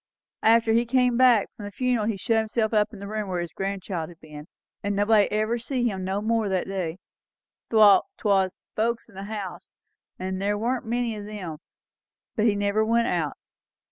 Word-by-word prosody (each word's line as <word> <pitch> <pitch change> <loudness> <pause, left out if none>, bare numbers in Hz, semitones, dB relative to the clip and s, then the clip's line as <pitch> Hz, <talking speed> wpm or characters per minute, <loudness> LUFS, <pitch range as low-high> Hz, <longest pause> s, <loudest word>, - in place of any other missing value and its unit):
And 225 +1 +6
after 225 -1 0
he 235 +1 +2
come 250 0 +3
back 245 -4 +5
from 210 - -8
the 205 - -6
funeral 245 -1 0
he 220 -3 -1
shut 225 +3 +1
himself 220 0 -1
up 210 0 +2
in 215 - -10
the 200 +1 -7
room 215 -1 -3
where 180 -1 -1
his 175 -2 -4
grandchild 190 -2 -4
had 170 -2 -15
been 150 -1 -11 0.3
and 205 0 -1
nobody 205 +1 +3
ever 215 +3 0
see 245 +1 -1
him 190 -4 -3
no 190 +2 -1
more 225 0 +1
from 195 - -1
that 185 - 0
day, 185 -4 -3 0.7
'thout 215 - +6
'twas 195 -3 +2
the - - -38
folks 230 +1 -1
in - - -18
the 195 +1 -7
house; 205 -3 -6 0.5
and 185 +1 -4
there 205 +1 0
warn't 240 +2 -2
many 235 -1 -1
o' 210 - -7
them; 190 -7 -7 0.8
but 220 -2 +2
he 210 - +3
never 205 +1 +1
went 230 +1 +2
out. 165 -4 -1
210 Hz, 205 wpm, -25 LUFS, 195-230 Hz, 0.8 s, And